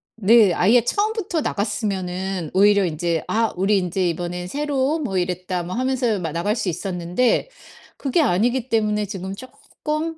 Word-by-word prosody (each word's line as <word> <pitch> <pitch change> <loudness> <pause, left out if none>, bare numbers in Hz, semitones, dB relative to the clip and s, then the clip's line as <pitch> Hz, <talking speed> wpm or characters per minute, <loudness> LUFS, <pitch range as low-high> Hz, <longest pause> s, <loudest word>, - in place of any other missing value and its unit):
네 220 -2 +5
아예 230 +5 +4
처음부터 410 - -1
나갔으면은 190 - -2
오히려 200 0 +5
인제 165 0 -1
"아 225 0 0
우리 195 +3 +2
인제 180 -1 0
이번에 175 +1 -4
새로 285 - 0
온 315 - -3
뭐 195 -7 -1
이랬다." 180 0 -2
뭐 175 +2 -5
하면서 250 -3 0
마 165 -3 -3
나갈 175 +6 -1
수 210 - -2
있었는데 180 - 0 0.5
그게 275 +3 0
아니기 240 +2 +1
때문에 210 -2 +1
지금 195 -1 -6
쪼끔 315 - -5
205 Hz, 330 characters per minute, -22 LUFS, 180-255 Hz, 0.5 s, 네